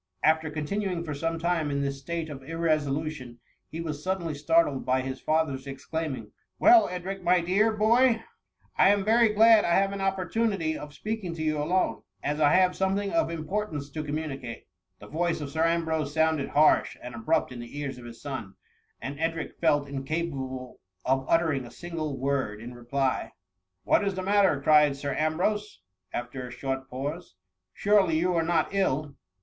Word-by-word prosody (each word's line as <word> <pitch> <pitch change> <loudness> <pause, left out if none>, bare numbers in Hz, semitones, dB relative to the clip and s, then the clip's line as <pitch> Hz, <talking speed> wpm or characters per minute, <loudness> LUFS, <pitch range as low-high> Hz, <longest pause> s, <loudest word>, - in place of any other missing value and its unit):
After 160 0 +3
continuing 175 +4 -2
for 155 -3 -4
some 165 +3 -2
time 165 -2 0
in 140 0 -1
this 140 0 -3
state 165 +3 -4
of 135 -2 -8
irresolution, 155 -4 -2 0.3
he 160 - -6
was 150 -3 -5
suddenly 185 -4 -2
startled 150 -1 +2
by 130 0 +1
his 130 0 -5
father^s 145 -4 0
exclaiming, 135 -5 -5 0.3
Well, 340 +1 +6
Edric, 185 +2 -5
my 180 0 +4
dear 200 +6 +2
boy, 230 +3 +3 0.6
I 190 - +7
am 200 -1 +3
very 225 +1 +5
glad 220 +1 +6
I 170 - +2
have 195 0 +2
an 200 - -4
opportunity 195 -3 0
of 150 -1 -7
speaking 215 -6 -4
to 160 - -4
you 155 -1 0
alone, 165 -6 0 0.2
as 150 +1 -1
I 145 -1 +5
have 185 -1 +4
something 195 +1 0
of 330 - +1
importance 160 -3 -3
to 155 +1 -4
communicate,^ 145 -5 -5 0.3
The - - -11
voice 165 +9 -1
of 145 -2 -5
Sir 160 +1 +1
Ambrose 160 -3 0
sounded 160 -3 +2
harsh 150 +1 +3
and 125 0 -8
abrupt 115 +2 0
in 125 - -8
the 120 +4 -9
ears 140 -3 -4
of 120 - -11
his 115 -1 -10
scm, 130 -9 -6 0.4
and 140 +2 -6
Edric 165 0 -3
felt 145 -3 +2
incapable 135 -3 -4 0.3
of 135 0 +1
uttering 160 -5 +2
a 120 - -10
single 155 -2 -5
word 130 -6 -1
in 120 +2 -8
reply. 130 +2 -2 0.2
'* 95 0 -54
What - - +3
is 195 -1 -1
the 185 - -3
matter 195 -6 +3
?"" - - -16
cried 150 -2 +5
Sir 140 0 -3
Ambrose, 185 - -1 0.3
after 125 +1 -5
a - - -10
short 135 +1 -4
pause; 145 - -5 0.4
surely 200 -6 +3
you 180 +3 +1
are 165 - +2
not 165 +2 0
ill 150 -7 0
155 Hz, 180 wpm, -27 LUFS, 140-180 Hz, 0.6 s, I